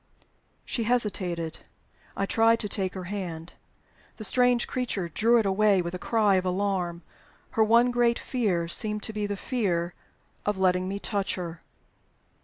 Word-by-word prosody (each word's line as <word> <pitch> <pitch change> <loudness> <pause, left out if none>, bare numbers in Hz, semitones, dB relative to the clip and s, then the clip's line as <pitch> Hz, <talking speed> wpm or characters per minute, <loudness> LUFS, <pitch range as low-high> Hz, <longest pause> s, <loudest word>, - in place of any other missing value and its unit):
She 230 - -2
hesitated. 185 -8 -1 0.6
I 195 - +1
tried 225 +2 +3
to 210 - -1
take 195 -2 -2
her 185 - -5
hand. 175 -3 -6 0.6
The 215 - -7
strange 245 +2 +3
creature 230 -9 -2
drew 230 +8 +3
it 225 - +2
away 200 0 +3
with 170 +1 -5
a 180 - -4
cry 210 -3 +2
of 185 - -1
alarm: 180 -3 -1 0.5
her 220 - +3
one 235 +3 +4
great 240 -1 +2
fear 195 -10 -1
seemed 210 +4 0
to 220 - -3
be 210 -1 -2
the 205 0 -3
fear 180 -8 -1 0.5
of 210 -1 -1
letting 185 -1 +2
me 195 +1 -3
touch 200 -1 -1
her. 170 -2 -6
200 Hz, 160 wpm, -27 LUFS, 180-225 Hz, 0.6 s, one